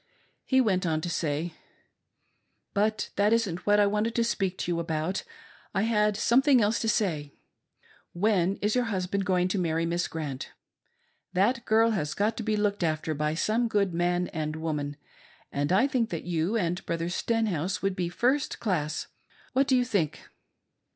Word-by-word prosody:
He 260 - +3
went 185 -6 +1
On 160 -1 +1
to 175 - -4
say: 160 0 -2 0.6
" - - -48
But 215 +1 0
that 205 +2 +3
isn't 200 -7 -1
what 205 0 +5
I 205 - +6
wanted 210 +3 0
to 235 - +3
speak 195 -5 -1
to 175 - -2
you 170 - 0
about"; 165 +2 -2 0.5
I 195 - +2
had 210 -2 +2
something 260 +4 +4
else 215 +1 +2
to 225 - 0
say. 155 -11 -1 0.8
When 190 0 +2
is 210 +1 +2
your 250 -1 +2
husband 195 -2 -1
going 180 -1 +2
to 195 - 0
mairry 165 -1 0
Miss 170 +1 0
Grant 150 -5 -5 0.4
} - - -44
That 235 +6 +2
girl 225 +1 +4
has 155 -8 -2
got 215 +2 +1
to - - -2
be 215 -1 0
looked 205 -2 0
after 155 -1 0
by 150 +1 -1
some 225 +7 +1
good 200 -5 +1
man 175 +1 +1
and 155 -4 -3
woman, 150 -3 -3 0.5
and 145 +3 -1
I 200 +8 +5
think 255 -5 0
that 165 - -4
you 175 +5 0
and 180 -2 -1
Brother 170 0 -1
Stenhouse 195 -3 -1
would 195 -1 0
do 175 -2 -1
first 255 +10 0
class. 155 -8 -1 0.5
What 270 +2 +3
do 265 - +4
you 250 - +2
think 200 - -1
190 Hz, 180 wpm, -28 LUFS, 165-220 Hz, 0.8 s, I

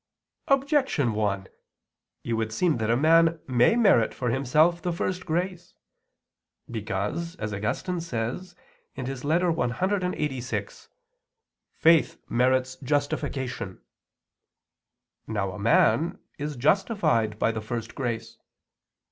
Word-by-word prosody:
Objection 275 - +2
1: 100 -2 -1 0.8
It 120 - -2
would 110 -1 -1
seem 160 +6 +1
that 110 -1 -1
a 115 - +3
man 165 +3 +4
may 125 - +3
merit 195 - +4
for 125 -2 -1
himself 150 +7 +2
the 175 - -1
first 185 +2 -3
grace, 175 +2 -3 1.0
because, 110 - -3
as 105 - -4
Augustine 105 - -2
says 165 +5 -4 0.4
(Ep. 130 - -4
clxxxvi), 155 - -1 0.9
"faith 165 -1 +4
merits 130 +1 +1
justification." 130 -6 -2 1.5
Now 95 0 -2
a 95 - -8
man 130 +9 +3 0.2
is 150 +1 -3
justified 130 - +1
by 115 - +2
the 110 -1 -4
first 115 +1 -5
grace. 115 -4 -4
135 Hz, 105 wpm, -26 LUFS, 115-170 Hz, 1.5 s, man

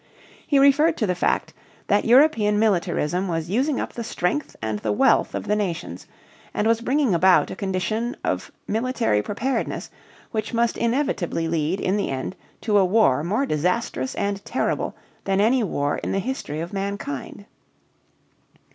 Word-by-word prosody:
He 285 - +3
referred 285 +4 +5
to 215 - +1
the 180 - +1
fact 180 - 0 0.3
that 205 - +2
European 230 -5 +4
militarism 185 -3 +1
was 165 0 -3
using 260 +6 +1
up - - -4
the 235 - -5
strength 230 +5 -2
and 110 -2 -3
the 105 - -1
wealth 105 - +3
of - - -4
the 210 - +2
nations 170 - -4 0.5
and 210 - 0
was 230 +1 +2
bringing 260 -2 +1
about 180 +2 +4
a - - -5
condition 215 +5 -2
of - - -2 0.2
military 225 - +1
preparedness 240 - -3 0.4
which 220 +1 -3
must 235 0 +2
inevitably 235 - -1
lead 165 +3 0
in 190 +2 0
the 205 - -1
end 135 +7 -4 0.3
to 210 -2 +3
a - - +5
war 185 - +3
more 215 +11 0
disastrous 155 - -1
and 200 0 -2
terrible 255 - -2 0.3
than 195 0 +1
any 235 +4 +3
war 145 -7 -1
in - - -3
the - - 0
history 195 - -3
of 170 +3 -6
mankind. 195 -3 -4
205 Hz, 160 wpm, -23 LUFS, 175-235 Hz, 0.5 s, referred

